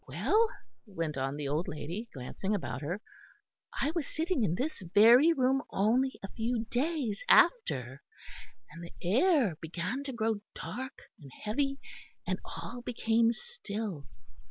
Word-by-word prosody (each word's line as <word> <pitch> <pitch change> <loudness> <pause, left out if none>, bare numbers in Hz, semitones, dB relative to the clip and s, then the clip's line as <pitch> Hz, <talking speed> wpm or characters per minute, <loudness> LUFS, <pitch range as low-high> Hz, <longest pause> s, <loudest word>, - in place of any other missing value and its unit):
"Well," 445 +1 +2 0.4
went 165 -6 -3
on 135 +1 -2
the 145 -1 -3
old 150 +5 -1
lady, 175 +10 -5
glancing 190 +10 -3
about 120 - -4
her, 175 +8 -3 0.8
"I 290 - +1
was 335 -5 -2
sitting 320 -4 0
in 170 -5 +1
this 270 +3 -3
very 240 +10 +8
room 270 -3 +2
only 245 +7 +1
a 195 - -6
few 230 0 -1
days 255 -5 -1
after, 130 - +4 0.7
and 165 +3 -9
the 170 - -10
air 235 - +3
began 180 - -3
to 275 - -3
grow 225 -2 0 0.2
dark 260 +4 -6 0.2
and 140 -3 -12
heavy, 275 +6 0 0.5
and - - -1
all 245 +1 -7
became 230 -1 +2
still. 220 - -6
225 Hz, 140 wpm, -31 LUFS, 170-270 Hz, 0.8 s, very